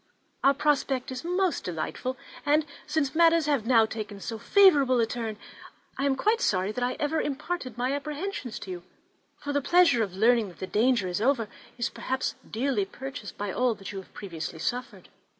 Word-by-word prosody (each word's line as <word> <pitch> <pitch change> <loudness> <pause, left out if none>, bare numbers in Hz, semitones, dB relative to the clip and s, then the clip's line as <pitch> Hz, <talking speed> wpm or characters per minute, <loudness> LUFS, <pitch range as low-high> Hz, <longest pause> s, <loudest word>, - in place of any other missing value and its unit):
Our 275 0 +5
prospect 275 -3 0
is 255 0 -5
most 360 +1 0
delightful, 185 +9 -3 0.3
and 295 +1 +3 0.2
since 300 -3 0
matters 330 -1 +5
have 280 -7 0
now 230 -3 +6
taken 215 -2 -6
so 225 +2 -5
favourable 280 - +5
a 230 - +4
turn, 225 -2 -4 0.6
I 275 - -1
am 270 - +2
quite 435 - +1
sorry 190 - +1
that 245 +3 -3
I 250 +1 +1
ever 305 +2 +1
imparted 290 -3 -4
my 250 +3 0
apprehensions 295 - -4
to 190 - -6
you; 175 -1 -6 0.5
for 285 - -4
the 285 - +1
pleasure 340 -5 +5
of 195 -4 -2
learning 230 +2 +4
that 175 -4 -13
the - - -4
danger 215 0 +2
is 180 +3 -2
over 235 -2 +2 0.3
is 240 - 0
perhaps 260 0 -2 0.2
dearly 235 -3 0
purchased 265 +1 -8
by 205 -1 -3
all 250 0 +1
that 195 -2 -8
you 195 - -5
have 190 - -13
previously 170 -4 -6
suffered. 245 +10 -4
255 Hz, 185 wpm, -27 LUFS, 215-290 Hz, 0.6 s, now